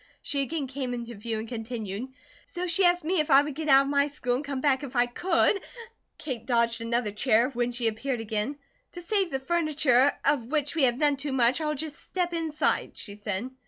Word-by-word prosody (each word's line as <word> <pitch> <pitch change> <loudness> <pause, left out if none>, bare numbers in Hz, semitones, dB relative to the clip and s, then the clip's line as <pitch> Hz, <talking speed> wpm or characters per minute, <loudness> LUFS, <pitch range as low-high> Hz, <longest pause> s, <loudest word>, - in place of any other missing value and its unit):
She 280 -1 0
again 285 +2 -2
came 260 -2 -4
into 235 0 -6
view 220 +1 -4
and 220 +1 -5
continued 225 -1 -5 0.4
"so 355 +1 -4
she 360 +2 +3
asked 350 -1 +3
me 350 +3 0
if 305 - 0
I 275 0 +7
would 295 0 -4
get 310 +2 -4
out 270 0 +7
of 275 - -4
my 280 0 +3
school 280 -4 -2
and 255 +4 -1
come 280 -2 -4
back 265 -1 +2
if 270 -2 -7
I 245 0 +4
could" 355 +9 +1 0.6
Kate 245 -6 -6
dodged 235 -2 +1
another 230 -1 0
chair; 230 +3 +2
when 245 -1 -1
she 240 -1 -1
appeared 235 +3 -2
again 225 +5 -3 0.4
"To 350 - -8
save 390 0 +1
the 270 - -2
furniture, 290 -4 +3
of 280 -5 +2
which 295 -2 0
we 315 -4 +3
have 245 -1 +1
none 290 -1 +2
too 280 0 -4
much, 250 +3 +3
I'll 300 -1 -1
just 305 +2 -6
step 355 -2 -3
inside," 320 -2 -1
she 200 - -8
said. 210 +3 -4
270 Hz, 220 wpm, -27 LUFS, 235-305 Hz, 0.6 s, I